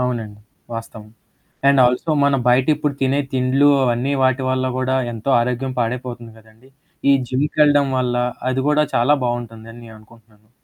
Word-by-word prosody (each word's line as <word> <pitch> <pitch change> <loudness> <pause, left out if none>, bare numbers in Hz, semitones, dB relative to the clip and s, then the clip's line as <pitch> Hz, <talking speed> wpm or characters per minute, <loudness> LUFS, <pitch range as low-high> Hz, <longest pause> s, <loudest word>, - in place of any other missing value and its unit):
అవునండి. 115 -4 -4 0.3
వాస్తవం. 110 -1 -9 0.6
And 140 -1 +4
also 125 +6 -1
మన 140 -1 +2
బయట 125 +1 +3
ఇప్పుడు 150 -1 -2
తినే 135 +2 +1
తిండ్లు 130 +2 +2 0.2
అవన్నీ 125 +3 0
వాటి 130 0 +1
వల్ల 130 0 -1
కూడా 130 0 -1 0.2
ఎంతో 115 +4 -4
ఆరోగ్యం 125 +2 -2
పాడైపోతుంది 120 -1 -4
కదండీ. 110 +4 -22 0.4
ఈ - - +6 0.2
జిమ్‌కెళ్లడం 145 +1 +2
వల్ల 125 -1 -1 0.3
అది 130 +1 -1
కూడా 150 0 +3
చాలా 120 +5 +3
బావుంటుందని 115 -1 -5
నేననుకుంటున్నాను. 110 -1 -19
125 Hz, 140 wpm, -19 LUFS, 115-135 Hz, 0.6 s, ఈ